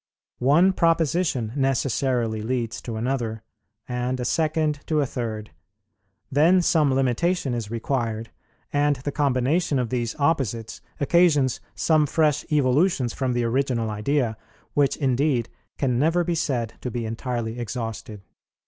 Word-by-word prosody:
One 155 Hz, +9 st, +4 dB
proposition 165 Hz, -8 st, +1 dB
necessarily 130 Hz, -4 st, 0 dB
leads 115 Hz, 0 st, -2 dB
to 115 Hz, -, -6 dB
another, 115 Hz, -2 st, -2 dB, 0.4 s
and 125 Hz, +1 st, -2 dB
a 125 Hz, -, -2 dB
second 155 Hz, -1 st, 0 dB
to 155 Hz, -2 st, +1 dB
a 145 Hz, -, +2 dB
third; 110 Hz, -6 st, -5 dB, 0.8 s
then 165 Hz, +6 st, +4 dB
some 155 Hz, -5 st, +3 dB
limitation 135 Hz, +3 st, +1 dB
is 115 Hz, -4 st, -3 dB
required; 115 Hz, -1 st, -2 dB, 0.4 s
and 145 Hz, 0 st, +3 dB
the 135 Hz, +2 st, -4 dB
combination 140 Hz, +3 st, +1 dB
of 125 Hz, -3 st, -1 dB
these 120 Hz, -2 st, -1 dB
opposites 130 Hz, -8 st, -1 dB, 0.2 s
occasions 145 Hz, -4 st, +3 dB, 0.2 s
some 155 Hz, -2 st, +3 dB
fresh 150 Hz, -1 st, +2 dB
evolutions 140 Hz, -2 st, +2 dB
from 130 Hz, -2 st, -1 dB
the 120 Hz, 0 st, 0 dB
original 120 Hz, -2 st, 0 dB
idea, 110 Hz, +2 st, 0 dB, 0.4 s
which 145 Hz, -2 st, +2 dB
indeed 130 Hz, -2 st, +1 dB, 0.3 s
can 125 Hz, -3 st, 0 dB
never 165 Hz, +5 st, +2 dB
be 170 Hz, 0 st, -1 dB
said 125 Hz, -8 st, -1 dB
to 125 Hz, -, -3 dB
be 120 Hz, 0 st, -3 dB
entirely 115 Hz, 0 st, -3 dB
exhausted. 110 Hz, -3 st, -5 dB
130 Hz, 130 wpm, -24 LUFS, 115-150 Hz, 0.8 s, One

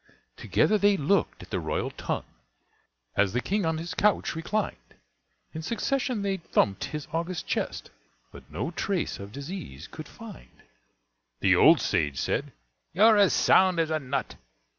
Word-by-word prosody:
Together 110 Hz, -, +2 dB
they 205 Hz, 0 st, +4 dB
looked 175 Hz, +4 st, 0 dB
at -, -, -15 dB
the -, -, -1 dB
royal -, -, -2 dB
tongue, -, -, -4 dB, 0.9 s
As 100 Hz, -1 st, +2 dB
the 125 Hz, -, +1 dB
King 195 Hz, +5 st, -1 dB
on 160 Hz, 0 st, 0 dB
his 170 Hz, +2 st, -5 dB
couch 210 Hz, 0 st, +2 dB
reclined; 200 Hz, +6 st, -3 dB, 0.6 s
In 160 Hz, -, -5 dB
succession 245 Hz, -, -1 dB
they 195 Hz, -1 st, 0 dB
thumped 100 Hz, -, 0 dB
his 150 Hz, -1 st, -6 dB
august 170 Hz, +1 st, -2 dB
chest, -, -, -3 dB, 0.4 s
But -, -, -14 dB
no 100 Hz, -, -3 dB
trace 185 Hz, +1 st, -2 dB
of 100 Hz, +1 st, -8 dB
disease 140 Hz, -, -7 dB
could -, -, -9 dB
find. -, -, -13 dB, 0.8 s
The 95 Hz, -1 st, +5 dB
old 155 Hz, -, +7 dB
sage 75 Hz, -8 st, 0 dB
said, -, -, -1 dB, 0.4 s
"You're 215 Hz, +5 st, +6 dB
as 200 Hz, -6 st, +5 dB
sound 180 Hz, +10 st, +4 dB
as 160 Hz, -1 st, +1 dB
a 155 Hz, -, +1 dB
nut." 140 Hz, -1 st, -3 dB
165 Hz, 155 wpm, -27 LUFS, -, 0.9 s, old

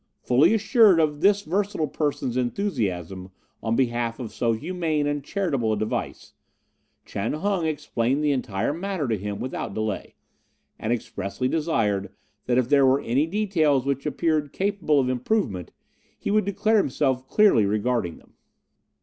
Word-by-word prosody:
Fully 145 Hz, -, +4 dB
assured 215 Hz, -4 st, +5 dB
of 150 Hz, -2 st, +1 dB
this 205 Hz, +2 st, +4 dB
versatile 190 Hz, -1 st, -1 dB
person's 145 Hz, -6 st, -2 dB
enthusiasm 100 Hz, -, -2 dB, 0.3 s
on 115 Hz, 0 st, 0 dB
behalf 120 Hz, -2 st, 0 dB
of 115 Hz, -4 st, -6 dB
so 115 Hz, 0 st, +1 dB
humane 160 Hz, +3 st, -1 dB
and 145 Hz, -1 st, -2 dB
charitable 140 Hz, -, -1 dB
a -, -, -1 dB
device, 110 Hz, +1 st, -4 dB, 0.7 s
Chan 100 Hz, +3 st, -3 dB
Hung 180 Hz, +1 st, 0 dB
explained 140 Hz, -2 st, -1 dB
the 150 Hz, -, +3 dB
entire 125 Hz, -2 st, -1 dB
matter 180 Hz, -3 st, -3 dB
to 115 Hz, -, +1 dB
him 100 Hz, 0 st, -5 dB
without 130 Hz, -5 st, -4 dB
delay, 110 Hz, -1 st, -3 dB, 0.6 s
and 110 Hz, -, -2 dB
expressly 110 Hz, 0 st, -3 dB
desired 110 Hz, -, 0 dB, 0.4 s
that 125 Hz, -1 st, +2 dB
if 130 Hz, -2 st, +2 dB
there 140 Hz, +1 st, +4 dB
were 135 Hz, +1 st, +4 dB
any 135 Hz, +7 st, +1 dB
details 165 Hz, -9 st, +1 dB
which 140 Hz, +1 st, -1 dB
appeared 150 Hz, -1 st, 0 dB
capable 190 Hz, -7 st, +1 dB
of 130 Hz, -, +1 dB
improvement, 125 Hz, -, -1 dB, 0.5 s
he -, -, -3 dB
would 215 Hz, -1 st, +2 dB
declare 205 Hz, +3 st, +2 dB
himself 130 Hz, -7 st, 0 dB
clearly 200 Hz, -, +4 dB
regarding 105 Hz, -4 st, -1 dB
them. -, -, -22 dB
140 Hz, 150 wpm, -24 LUFS, 115-170 Hz, 0.7 s, assured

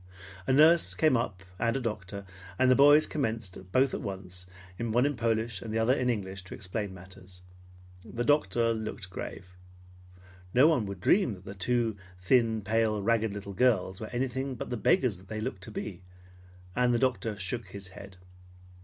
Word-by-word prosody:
A -, -, +2 dB
nurse 160 Hz, +5 st, +5 dB
came 155 Hz, -4 st, +3 dB
up 110 Hz, -5 st, -2 dB, 0.2 s
and 115 Hz, +2 st, +1 dB
a -, -, -1 dB
doctor, 100 Hz, -4 st, -5 dB, 0.3 s
and 130 Hz, 0 st, +4 dB
the -, -, +6 dB
boys 145 Hz, +3 st, +7 dB
commenced, 110 Hz, -9 st, -4 dB
both 130 Hz, +3 st, +3 dB
at -, -, -3 dB
once, 95 Hz, -3 st, -7 dB, 0.3 s
one 120 Hz, +2 st, +1 dB
in 145 Hz, 0 st, 0 dB
Polish 115 Hz, -3 st, -1 dB
and 110 Hz, -, -6 dB
the 110 Hz, -, -1 dB
other 115 Hz, +3 st, +3 dB
in 125 Hz, -2 st, 0 dB
English, 95 Hz, -4 st, -3 dB
to 95 Hz, -, -8 dB
explain 100 Hz, +1 st, -4 dB
matters. 90 Hz, 0 st, -13 dB, 0.6 s
The 120 Hz, -, -4 dB
doctor 120 Hz, -5 st, +2 dB
looked 110 Hz, -4 st, -6 dB
grave. 90 Hz, -, -7 dB, 1.1 s
No 130 Hz, +4 st, +7 dB
one 145 Hz, -11 st, +2 dB
would 100 Hz, -2 st, -7 dB
dream 185 Hz, -, +3 dB
that 90 Hz, 0 st, -16 dB
the 100 Hz, -, -7 dB
two 115 Hz, +2 st, 0 dB, 0.2 s
thin, 110 Hz, +2 st, +2 dB
pale, 110 Hz, 0 st, +1 dB
ragged 115 Hz, 0 st, +2 dB
little 100 Hz, 0 st, -7 dB
girls 95 Hz, -4 st, +1 dB
were 110 Hz, -, -4 dB
anything 130 Hz, +2 st, -2 dB
but -, -, -6 dB
the -, -, 0 dB
beggars 125 Hz, -, +2 dB
they 110 Hz, +3 st, -6 dB
looked 110 Hz, -4 st, -4 dB
to 110 Hz, -, -9 dB
be, 100 Hz, -4 st, -6 dB, 0.7 s
and 125 Hz, 0 st, +3 dB
the 120 Hz, -, +3 dB
doctor 115 Hz, -4 st, 0 dB
shook 105 Hz, +3 st, -3 dB
his 95 Hz, 0 st, -8 dB
head. 95 Hz, 0 st, -12 dB
110 Hz, 180 wpm, -29 LUFS, 95-125 Hz, 1.1 s, boys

